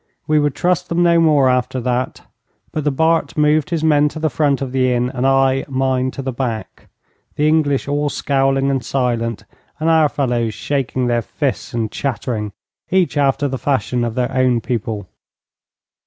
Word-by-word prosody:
We 155 Hz, 0 st, +2 dB
would 145 Hz, -2 st, 0 dB
trust 180 Hz, 0 st, 0 dB
them 170 Hz, +1 st, +1 dB
no 170 Hz, -1 st, +4 dB
more 150 Hz, -5 st, +4 dB
after 125 Hz, 0 st, 0 dB
that, 125 Hz, +1 st, -2 dB, 0.5 s
but 155 Hz, -, -3 dB
the -, -, +3 dB
Bart 160 Hz, +4 st, +1 dB
moved 150 Hz, +2 st, +2 dB
his 165 Hz, -3 st, -1 dB
men 150 Hz, -2 st, +4 dB
to 155 Hz, -, -10 dB
the 155 Hz, -1 st, -1 dB
front 145 Hz, -3 st, +1 dB
of 135 Hz, -2 st, -4 dB
the 130 Hz, -1 st, +1 dB
inn, 125 Hz, +1 st, 0 dB
and 130 Hz, +1 st, 0 dB
I 135 Hz, 0 st, +3 dB
mine 130 Hz, -1 st, 0 dB
to 135 Hz, -, -7 dB
the 130 Hz, -, -2 dB
back, 120 Hz, -3 st, -5 dB, 0.5 s
the 150 Hz, -, +1 dB
English 150 Hz, -4 st, +1 dB
all 145 Hz, +1 st, 0 dB
scowling 135 Hz, -1 st, +1 dB
and 135 Hz, -2 st, -1 dB
silent, 120 Hz, -4 st, -1 dB, 0.4 s
and 160 Hz, +1 st, +2 dB
our 160 Hz, -2 st, +4 dB
fellows 120 Hz, -6 st, -1 dB
shaking 130 Hz, -3 st, -2 dB
their 120 Hz, -1 st, +1 dB
fists 135 Hz, +2 st, -3 dB
and 110 Hz, -2 st, -1 dB
chattering, 115 Hz, -6 st, -3 dB, 0.4 s
each 185 Hz, -3 st, +1 dB
after 145 Hz, 0 st, +2 dB
the 130 Hz, -1 st, -4 dB
fashion 125 Hz, -3 st, 0 dB
of 115 Hz, -1 st, -3 dB
their 125 Hz, +1 st, -1 dB
own 130 Hz, -2 st, +3 dB
people. 110 Hz, -5 st, -3 dB
135 Hz, 180 wpm, -18 LUFS, 125-150 Hz, 0.5 s, no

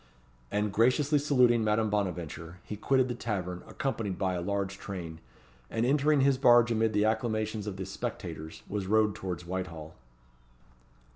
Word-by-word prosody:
And 105 Hz, -1 st, -1 dB
graciously 135 Hz, +7 st, +3 dB
saluting 125 Hz, -5 st, +4 dB
Madame 110 Hz, 0 st, +1 dB
Bonaventure, 90 Hz, -4 st, -3 dB
he 105 Hz, -, -6 dB
quitted 130 Hz, +4 st, +2 dB
the 125 Hz, -, -2 dB
tavern 95 Hz, -7 st, -3 dB
accompanied 110 Hz, -8 st, -3 dB
by 95 Hz, -2 st, 0 dB
a 90 Hz, -, -2 dB
large 100 Hz, +1 st, -2 dB
train, 85 Hz, -5 st, -6 dB, 0.5 s
and 115 Hz, +1 st, 0 dB
entering 145 Hz, +2 st, +3 dB
his 135 Hz, -1 st, +3 dB
barge 120 Hz, -2 st, +6 dB
amid 110 Hz, -1 st, +1 dB
the 105 Hz, +1 st, +3 dB
acclamations 110 Hz, -1 st, -1 dB
of 100 Hz, -2 st, -4 dB
the 95 Hz, -, -4 dB
spectators, 80 Hz, -4 st, -6 dB
was 100 Hz, -2 st, -3 dB
rowed 105 Hz, 0 st, +3 dB
towards 90 Hz, -3 st, -5 dB
Whitehall. 85 Hz, -4 st, -5 dB
105 Hz, 150 wpm, -29 LUFS, 95-120 Hz, 0.5 s, barge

